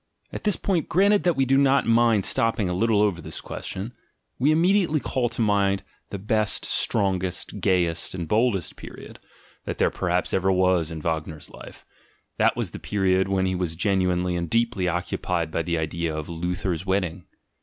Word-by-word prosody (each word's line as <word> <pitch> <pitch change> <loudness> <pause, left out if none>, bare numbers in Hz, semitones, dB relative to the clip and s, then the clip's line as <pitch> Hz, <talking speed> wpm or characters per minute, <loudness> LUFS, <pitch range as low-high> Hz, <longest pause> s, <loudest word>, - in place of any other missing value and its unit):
At - - -6
this 210 - +2
point 180 -6 -1
(granted 200 +4 +4
that 175 -3 +3
we 135 - +2
do 135 +1 +3
not 140 0 +3
mind 115 -3 +3
stopping 115 -3 +1
a 90 - -1
little 105 +2 +2
over 95 -5 0
this - - -7
question), 105 +6 -6 0.5
we 135 +4 +3
immediately 170 0 +3
call 125 -3 -1
to 115 0 -1
mind 100 -2 +1 0.3
the - - -5
best, 105 +2 0
strong 95 -4 +1
est, 95 +2 -5
gayest, 90 -3 0
and 85 -3 -4
boldest 105 -4 +1
period, - - -11 0.5
that - - -4
there - - +2
perhaps - - -1
ever 95 +1 +2
was 90 -3 +2
in 80 -2 -6
Wagner's 80 -2 -3
life: - - -12 0.5
that - - +3
was - - -2
the - - -8
period 95 -2 +1
when 95 -1 +1
he 95 - 0
was 90 -3 -2
gen 95 +2 +1
uinely 90 0 0
and 85 -1 -3
deeply 115 -5 +1
occupied 85 -1 -2
with 85 0 -2
the 85 -1 0
idea 80 0 -2
of 75 - -5
"Luther's 90 +1 -3
Wedding." 95 -2 -2
95 Hz, 185 wpm, -24 LUFS, 90-115 Hz, 0.5 s, granted